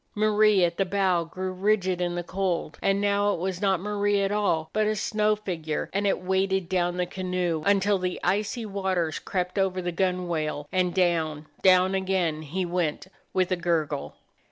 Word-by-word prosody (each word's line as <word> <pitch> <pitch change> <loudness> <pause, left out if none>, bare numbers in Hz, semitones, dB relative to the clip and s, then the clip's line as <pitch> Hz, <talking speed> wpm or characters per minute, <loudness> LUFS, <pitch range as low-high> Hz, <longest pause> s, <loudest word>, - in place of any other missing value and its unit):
Marie 215 -2 +4
at 170 0 -3
the 195 - +3
bow 185 -2 +1
grew 185 +3 -5
rigid 185 -1 +1
in 175 0 -1
the 175 - -2
cold; 180 -4 -2
and 195 0 +2
now 205 0 +2
it - - -7
was 185 0 -3
not 195 -3 +2
Marie 205 +1 0
at 195 - 0
all, 185 -7 +1
but 215 0 +2
a 215 - +1
snow 215 +1 +1
figure, 165 -7 -4
and 200 +1 +1
it 195 - +1
weighted 190 0 0
down 175 -1 0
the 180 - +1
canoe 180 -3 -2
until 200 0 +3
the 180 0 -2
icy 210 +4 0
waters 190 -5 -1
crept 180 0 -2
over 190 -1 +1
the 175 -1 -2
gunwale, 170 -5 -1
and 180 -1 +1
down, 160 -4 +1 0.2
down 185 0 +5
again 185 -5 0
he 175 +5 -3
went 175 -3 -1 0.3
with 185 0 0
a - - +3
gurgle. 165 -5 -1
185 Hz, 180 wpm, -26 LUFS, 175-200 Hz, 0.3 s, down